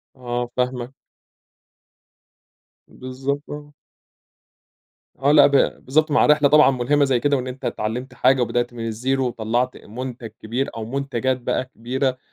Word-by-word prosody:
آه 120 -1 -4
فاهمك. 125 0 -2 1.9
بالضبط 135 +3 -4
آه. 145 0 -9 1.4
آه 135 +2 +2
لأ 150 -1 +7
ب - - -3 0.3
بالضبط 155 +4 +2
مع 145 - +4
الرحلة 150 -1 +4
طبعًا 150 -1 +6
مُلهمة 135 +3 +2
زي 130 -3 +1
كده 145 +2 +1
وإن 130 0 -4
أنت 130 +1 -7
اتعلّمت 120 +5 -3
حاجة 130 0 +3
وبدأت 120 0 -1
من 115 -1 -5
الزيرو 130 +4 -1
وطلّعت 120 +2 -1
مُنتج 120 +1 -7
كبير 120 +5 -2
أو 115 -1 -5
مُنتجات 130 0 -2
بقى 125 - -1
كبيرة، 130 +1 -2
130 Hz, 135 wpm, -22 LUFS, 120-140 Hz, 1.9 s, لأ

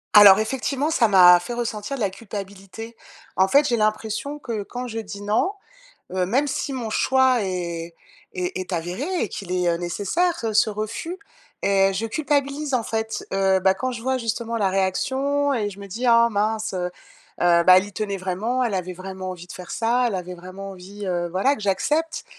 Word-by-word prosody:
Alors, 205 -1 +10
effectivement, 265 +6 -1
ça 235 -8 +4
m'a 180 -3 +8
fait 240 +7 -6
ressentir 235 +1 -3
de 250 - -6
la 195 -2 +1
culpabilité. 200 +2 -8 0.4
En 190 0 +4
fait, 285 +6 +4
j'ai 235 - +1
l'impression 220 +6 -1
que 230 -7 -4
quand 245 +4 -6
je 225 -1 -4
dis: 200 -2 -7
«non», 220 - +1 0.6
heu, 185 -1 +1
même 260 +10 +1
si 275 0 -2
mon 240 -4 -3
choix 260 0 +3
est 170 -3 -4 0.4
est 180 0 -3
est 185 0 -5
avéré 175 - -3 0.2
et - - 0
qu'il 185 -3 -6
est, 180 -1 +1
heu, 170 - +2
nécessaire, 205 - 0
heu, 220 -2 -1
ce 215 - +4
refus 215 - -4 0.4
et 195 0 +3
je 220 +4 -2
culpabilise, 285 +2 -1
en 245 -3 +2
fait, 220 0 -3
heu, 190 -1 +3
bah, 190 0 +4
quand 255 +6 -3
je 235 - -6
vois, 260 +1 0
justement, 230 -1 -2
la 200 -3 +1
réaction 270 +9 0
et 215 -5 0
je 200 0 -10
me 200 - -8
dis: 230 +6 -4
«Ah 235 0 +6
mince, 215 +1 -1
heu 180 -1 -2
heu, - - -5 0.7
bah, 185 0 +8
elle 185 - +4
y 205 - -10
tenait 200 -1 -3
vraiment. 210 +8 -1
Elle 220 -5 -1
avait 185 0 -3
vraiment 185 0 -7
envie 175 -1 -8
de - - -8
faire 180 -1 -9
ça. 240 +2 +1
Elle 220 - -1
avait 180 0 -4
vraiment 185 +3 -9
envie, 195 +2 -9
heu, 175 -1 -1
voilà 195 +11 +2
que - - -10
j'accepte» 295 +12 0
210 Hz, 205 wpm, -23 LUFS, 190-245 Hz, 0.7 s, Alors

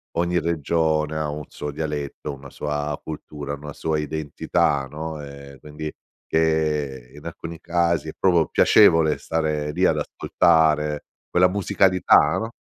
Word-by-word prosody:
ogni 85 +1 +1
regione 80 -1 0
ha 75 - -1
un 75 +1 -5
suo 75 - -6
dialetto, 75 -1 -4
una 70 0 -11
sua 75 0 -3
cultura, 75 -2 -6
una 75 0 -9
sua 80 -1 -1
identità, 75 -2 -1
no, 80 +2 -6
ehm, 70 -1 -11
quindi 75 +2 -7 0.3
che 75 -5 0
in 75 - -13
alcuni 85 0 -7
casi 85 -2 0
è - - -5
proprio 85 -4 +3
piacevole 80 -7 +5
stare 75 -2 -2
lì - - -1
ad - - +4
ascoltare 75 -2 +2 0.3
quella 90 +1 +4
musicalità, 95 -1 +3
no, 115 +1 -4
75 Hz, 140 wpm, -23 LUFS, 75-80 Hz, 0.3 s, piacevole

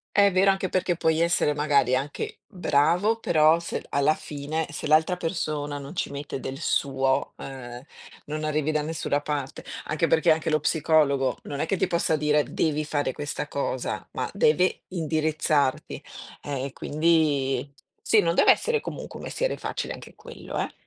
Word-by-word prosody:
È 200 -1 +5
vero, 190 +2 +5
anche 190 -1 0
perché 185 -2 0
puoi 160 -1 +1
essere 170 -3 +2
magari 145 -4 +2
anche 150 - -3
bravo, 180 +5 +1
però 160 -1 +4
se 170 - -4
d - - -19
alla 140 +2 +2
fine, 150 +2 -4
se 145 - -5
l'altra 160 +4 +4
persona 155 -4 -3
non 140 +5 -9
ci - - -2
mette 140 -1 -5
del 135 +1 -5
suo, 135 -4 0
ehm, 125 -2 -8 0.4
non 155 +1 -4
arrivi 155 0 0
da 150 -1 +1
nessuna 150 -2 -1
parte. 145 -2 -4 0.2
Anche 160 +2 0
perché 160 0 +4
anche 160 0 -1
lo 155 - +3
psicologo 145 -4 +2
non 145 0 -5
è - - 0
che 195 - 0
ti 190 - +1
possa 170 -2 +1
dire: 150 0 +2
"Devi 155 0 -1
fare 145 -3 -1
questa 145 +1 -4
cosa", 135 -3 -3
ma - - -2
deve 170 +5 +2
indirizzarti. 155 -4 0 0.4
Eh, 140 -2 -3
e 140 - -5
quindi 145 -4 +1 0.3
sì, 220 - +3
non 170 -2 +1
deve - - +5
essere 460 -1 +2
comunque - - -7
un - - -8
mestiere - - -1
facile - - -4
anche - - -11
quello, - - -8
eh. - - -2
155 Hz, 175 wpm, -26 LUFS, 140-165 Hz, 0.4 s, È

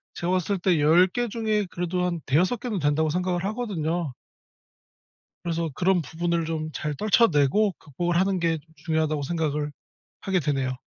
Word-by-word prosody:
제가 175 +1 -2
봤을 185 +2 0
때 180 -2 +2
10 160 +5 +6
개 240 +6 -2
중에 215 -2 0
그래도 180 +1 -2
한 175 -2 -1
5-6 180 - +2
개는 220 -5 -3
된다고 150 +1 +1
생각을 180 +1 -1
하거든요. 175 - -2 1.3
그래서 170 -1 -1
'그런 185 +2 +2
부분을 170 +1 -1
좀 155 -1 -3
잘 150 0 -3
떨쳐내고 200 - +3
극복을 170 +4 -2
하는 190 0 +2
게 165 -1 +1 0.2
중요하다.'고 155 -1 -1
생각을 150 -1 -1 0.5
하게 190 -2 +1
되네요. 135 -4 -1
170 Hz, 315 characters per minute, -25 LUFS, 155-185 Hz, 1.3 s, 10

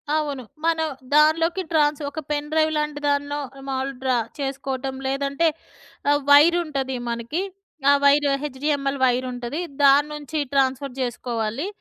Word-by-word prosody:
అవును. 290 -4 -2 0.2
మనం 325 -1 +2 0.3
దానిలోకి 325 +4 +4
ట్రాన్స్ 300 -2 +2
ఒక 300 - -6
పెన్ 295 0 -1
డ్రైవ్ 315 0 +2
లాంటి 300 -1 -2
దాన్నో 285 0 0 0.3
మాములు 265 +1 -2
డ్రా 260 -2 +1 0.2
చేసుకోవటం 270 -1 -3
లేదంటే 280 +4 0 0.6
ఆహ్, 290 0 +3
వైర్ 300 +5 +7
ఉంటది 270 -4 -3
మనకి. 235 +9 -2 0.5
ఆ - - +8
వైర్ 285 +1 +5 0.2
హెచ్‍డిఎంఎల్ 280 0 -1
వైర్ 255 0 +2
ఉంటాది. 245 +5 -5 0.2
దాని 285 +1 +6
నుంచి 300 +1 -5 0.2
ట్రాన్స్ఫర్ 270 0 +1
చేసుకోవాలి. 240 - -2
285 Hz, 130 wpm, -23 LUFS, 265-300 Hz, 0.6 s, ఆ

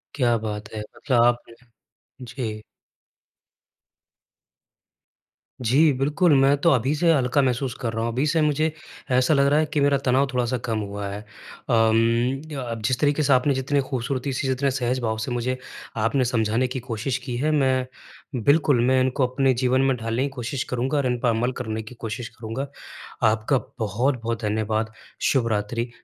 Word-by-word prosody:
क्या 120 -4 +2
बात 105 -1 -5
है! 110 - -4 0.2
मतलब 125 -4 +1
आप 120 0 +2 0.8
जी। 115 -4 -5 3.0
जी, 140 +7 +4
बिल्कुल, 150 +5 +2
मैं 140 +1 +5
तो 170 - +4
अभी 130 +3 +2
से 165 +2 +3
हल्का 135 0 +2
महसूस 125 -1 0
कर 115 -2 -2
रहा 115 - -2
हूँ। 115 - -1
अभी 130 +5 0
से 160 +1 +2
मुझे 150 +1 +1 0.4
ऐसा 130 +4 +3
लग 140 -1 +4
रहा 145 +2 +4
है 155 - +2
कि 150 - +1
मेरा 140 0 +4
तनाव 130 +2 +3
थोड़ा-सा 125 0 0
कम 110 -3 -1
हुआ 100 0 -4
है। 100 +1 -5
अम, 115 +3 0 0.2
अ - - -3
अ, 115 -1 -4
जिस 130 -1 +1
तरीके 145 +1 +2
से 140 - +4
आपने 130 +3 +3
जितनी 135 +2 0
खूबसूरती 130 +1 -2
से, 130 - -2
जितने 135 +1 +1
सहज 130 -1 -1
भाव 110 -2 -1
से 115 +3 -4
मुझे 125 +1 -1 0.5
आपने 130 +3 +2
समझाने 115 +1 +1
की 130 +1 -4
कोशिश 125 +2 -3
की 125 -3 -3
है, 150 +4 +1
मैं 130 -3 +2 0.6
बिल्कुल, 145 -3 +4
मैं 130 0 +3
इनको 130 0 +1
अपने 130 +1 +2
जीवन 130 +1 +2
में 135 -1 +2
ढालने 115 +3 -1
की 140 - -1
कोशिश 125 0 -4
करूँगा 130 +4 0
और 140 - +1
इन 125 -1 -1
पर 120 - +1
अमल 115 +3 +1
करने 110 -2 -3
की 120 +3 -11
कोशिश 115 +1 -5
करूँगा। 120 +5 -4 0.6
आपका 110 +5 +1 0.2
बहुत-बहुत 115 +2 -1
धन्यवाद, 110 +1 -1 0.4
शुभ 125 -4 +2
रात्रि, 115 +4 -2
125 Hz, 175 wpm, -24 LUFS, 115-135 Hz, 3.0 s, मैं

